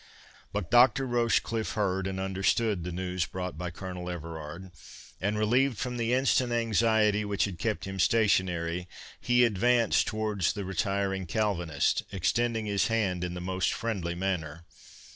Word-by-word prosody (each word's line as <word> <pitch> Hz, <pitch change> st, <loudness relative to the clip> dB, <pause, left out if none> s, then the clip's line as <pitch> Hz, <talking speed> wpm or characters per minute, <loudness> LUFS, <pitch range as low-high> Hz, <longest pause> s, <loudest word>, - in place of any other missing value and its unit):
But 100 Hz, -4 st, -4 dB
Dr. 125 Hz, +2 st, +5 dB
Rochecliffe 115 Hz, -2 st, 0 dB
heard 95 Hz, -3 st, 0 dB
and 95 Hz, 0 st, -4 dB
understood 95 Hz, +1 st, 0 dB
the 90 Hz, -, -4 dB
news 90 Hz, 0 st, -2 dB
brought 90 Hz, -1 st, -5 dB
by 90 Hz, +3 st, -4 dB
Colonel 90 Hz, 0 st, -6 dB
Everard, 85 Hz, +1 st, -7 dB, 0.5 s
and, 105 Hz, +3 st, 0 dB
relieved 120 Hz, +3 st, +2 dB
from 125 Hz, +2 st, -3 dB
the 115 Hz, 0 st, 0 dB
instant 130 Hz, -1 st, +2 dB
anxiety 110 Hz, -2 st, +2 dB
which 100 Hz, -1 st, 0 dB
had 95 Hz, -4 st, -6 dB
kept 110 Hz, -2 st, -2 dB
him 95 Hz, 0 st, -6 dB
stationary, 90 Hz, -4 st, +1 dB, 0.3 s
he 125 Hz, 0 st, +4 dB
advanced 115 Hz, +2 st, +2 dB
towards 105 Hz, -5 st, 0 dB
the 100 Hz, -2 st, -5 dB
retiring 95 Hz, +1 st, -1 dB
Calvinist, 85 Hz, -6 st, 0 dB
extending 115 Hz, +4 st, 0 dB
his 100 Hz, -2 st, +1 dB
hand 100 Hz, -6 st, 0 dB
in 90 Hz, 0 st, -3 dB
the 90 Hz, -, -5 dB
most 90 Hz, 0 st, -1 dB
friendly 95 Hz, -7 st, -3 dB
manner. 85 Hz, -3 st, -3 dB
100 Hz, 145 wpm, -29 LUFS, 90-115 Hz, 0.5 s, Dr